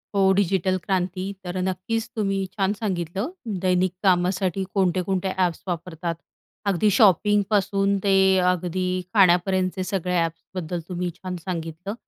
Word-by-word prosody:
हो 195 -1 +4
डिजिटल 190 -1 +1
क्रांती. 185 +1 -2
तर 180 0 -5
अ, 185 - 0
नक्कीच 190 +5 -2
तुम्ही 195 -3 0
छान 195 0 +2
सांगितलं. 190 - -3 0.4
दैनिक 180 0 +2
कामासाठी 185 0 +2
कोणते-कोणते 190 0 0
ॲप्स 180 -3 0
वापरतात. 170 -1 -3 0.5
अगदी 200 +1 +2
शॉपिंग 205 - +4
पासून 200 -1 +2
ते 200 -1 +3 0.4
अगदी 180 +1 -2 0.3
खाण्यापर्यंतचे 185 -1 +3
सगळे 185 -1 -2
ॲप्सबद्दल 165 +1 -4
तुम्ही 180 0 -2
छान 185 0 -6
सांगितलं. 170 +2 -4
185 Hz, 125 wpm, -24 LUFS, 180-195 Hz, 0.5 s, हो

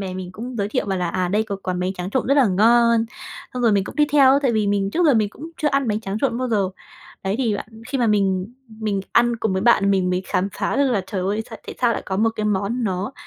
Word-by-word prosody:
bè 190 -2 -4
mình 185 -1 -6
cũng 240 +5 -7
giới 200 -1 -1
thiệu 210 - -1
bảo 195 -2 -1
là 180 -1 -1
"À, 180 +1 -1
đây 210 +4 +1
có 205 -3 -4
quán 180 -1 -2
bánh 185 +1 -1
tráng 180 0 -6
trộn 260 - -1
rất 275 - +3
là 275 -4 +5
ngon." 230 +3 +4 0.5
Xong 250 - -2
rồi 230 - +4
mình 200 -1 +2
cũng - - -9
đi 300 - +5
theo 275 -2 +6
tại 260 -4 +2
vì 215 -2 +1
mình 200 -1 0
trước 340 +8 +2
giờ 285 - +5
mình 215 -2 +2
cũng 315 +9 -10
chưa 305 - +1
ăn 275 -3 0
bánh 210 0 0
tráng 200 -1 -4
trộn 255 -4 0
bao 255 0 -2
giờ. 205 -5 +1 0.5
Đấy, 195 +1 -1
thì 225 -6 +1
bạn - - -7 0.2
khi 270 - -2
mà 240 - +2
mình 195 0 0 0.3
mình 205 -3 -1
ăn 240 0 +3
cùng 220 -3 -1
với 190 +1 -1
bạn 210 -4 +4
mình 185 -2 +1
mới 180 +1 -1
khám 185 +2 0
phá - - -1
được 280 -1 +2
là 220 -5 +1
trời 200 -4 -3
ơi 200 +4 -1
s - - -12
tại - - -7
sao 240 -2 +3
lại - - -4
có 190 - -2
một 225 +3 +2
cái 215 - -2
món 210 +4 -1
nó 190 +5 -2
210 Hz, 295 wpm, -21 LUFS, 195-240 Hz, 0.5 s, theo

